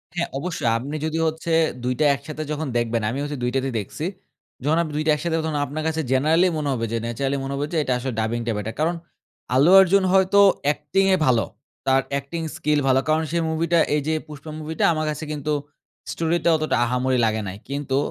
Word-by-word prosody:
হ্যাঁ 175 - -1
অবশ্যই। 165 -7 -2
আপনি 140 +6 -5
যদি 160 +1 -2
হচ্ছে 160 +1 -2 0.3
২টা 125 +5 0
একসাথে 155 +2 -7
যখন 150 0 -2
দেখবেন। 115 -1 0
আমি 130 - -3
হইসে 145 -1 -4
২টা 125 +2 +1
তেই 135 -2 -3
দেখছি। 125 +10 -5 0.6
যখন 155 +3 +2
আপনি 155 -3 -4
২টা 155 +1 +2
একসাথে 165 +2 -2
তখন 155 -2 -2
আপনার 155 +3 -5
কাছে 160 0 -1
জেনারেলি 155 +7 +3
মনে 150 -2 -2
হবে 115 -2 -2
যে 115 - 0
ন্যাচারালি 135 +4 -1
মনে 135 +1 -4
হবে 145 +1 -1
যে - - +1
এটা 130 - 0
আসলে 125 0 -4
ডাবিংটা 115 +1 -1
বেটার। 110 +2 -4
কারণ, 170 +3 +1 0.6
আল্লু 145 +7 +5
অর্জুন 190 +1 +5
হয়তো 190 +1 +4 0.3
অ্যাক্টিংয়ে 185 +6 +2
ভালো। 120 -4 +3 0.4
তার 135 0 +4
অ্যাক্টিং 140 +4 -3 0.2
স্কিল 150 -1 +1
ভালো। 130 0 +4
কারণ 155 +1 +2
সেই 170 -1 0
মুভিটা 165 +1 +1 0.2
এইযে 150 +2 0
'Pushpa' 150 +1 -9
মুভিটা 155 +1 -3
আমার 155 0 -1
কাছে 150 +1 -6
কিন্তু 150 0 -2 0.6
স্টোরিটা 170 +1 0
অতটা 155 0 0
আহামরি 125 +1 0
লাগে 110 0 0
নাই। 95 +1 -6
কিন্তু 140 -1 -2
150 Hz, 190 wpm, -23 LUFS, 130-160 Hz, 0.6 s, আল্লু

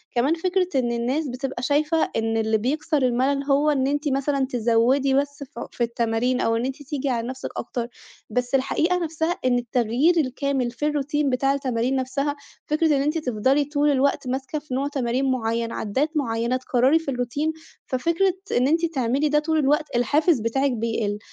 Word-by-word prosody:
كمان 255 +6 +3
فكرة 365 +2 0
إن 240 -2 0
الناس 250 +6 -1
بتبقى 255 0 -4
شايفة 300 +4 +2
إن 225 0 0
اللي 220 0 +2
بيكسر 295 +6 -1
المَلَل 260 +3 +1
هو 285 +2 +2
إن 270 -3 +1
أنتِ 290 +2 -1
مثلًا 275 0 +1
تزوِّدي 245 +3 +2
بس 285 +1 0
ف 260 -3 -11
في 240 - -2
التمارين 235 +2 0
أو 225 - +1
إن 230 +2 -1
أنتِ 270 +2 -5
تيجي 280 0 -3
على 235 -2 -1
نَفْسِك 260 +1 -5
أكتر. 235 0 -3 0.4
بس 245 +3 -1
الحقيقة 320 +6 +1
نَفْسها 325 0 -1
إن 250 -1 +3
التغيير 245 +7 +1
الكامل 265 -3 0
في 250 +5 -4
الروتين 295 0 0
بتاع 270 +2 +1
التمارين 255 -2 -1
نَفْسها، 275 +2 -1 0.3
فكرة 310 +2 +1
إن - - +1
أنتِ 300 +3 0
تفضلي 265 0 +1
طول 295 +1 +1
الوقت 275 -1 +1
ماسكة 265 +3 -3
في 290 -3 -9
نوع 270 +2 0
تمارين 265 -1 0
معيّن، 230 -2 -1
عدّات 260 +10 -1
معيّنة 235 -3 0
تكرّري 255 +4 +2
في 320 -4 -4
الروتين، 260 +5 -1 0.3
ففكرة 335 +8 +1 0.2
إن 250 +2 +3
أنتِ 330 +3 +2
تعملي 275 -2 0
ده 300 +1 +3
طول 315 +1 0
الوقت، 295 0 +1
الحافز 290 +5 +3
بتاعِك 270 +5 0
بيقل. 225 -3 -1
270 Hz, 175 wpm, -23 LUFS, 245-295 Hz, 0.4 s, كمان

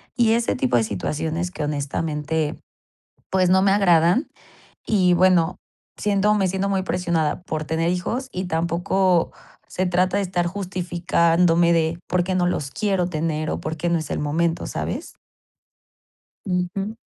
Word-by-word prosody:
y 235 -3 +3
ese 235 0 +1
tipo 125 -1 +1
de 115 - +2
situaciones 160 - -3
que 160 - -5
honestamente, 150 +1 -2 0.7
pues, 185 -1 +2
no 190 +1 +5
me 195 - +4
agradan. 180 - +3 0.6
Y 185 -4 +3
bueno, 180 -1 +3 0.4
siento 210 0 +2
me 195 -2 +1
siento 190 +2 -1
muy 190 -1 0
presionada 170 -3 -1
por 155 -4 -4
tener 165 +2 0
hijos, 235 +9 -2
y 185 -4 -4
tampoco 170 +1 +1 0.3
se 185 - -2
trata 185 +2 +1
de - - +1
estar 180 -2 -1
justificándome 175 -2 +1
de, 165 0 +1
por 180 0 +1
qué 185 +1 -1
no 180 -1 +2
los 145 -6 -2
quiero 195 -4 0
tener, 155 -2 -2
o, - - -2
por 160 +1 -4
qué 175 +3 -2
no 170 -1 +2
es 155 - -6
el - - -2
momento, 165 +3 0
¿sabes? - - -5 1.3
Ujú. 195 +4 -2
175 Hz, 155 wpm, -22 LUFS, 160-190 Hz, 1.3 s, no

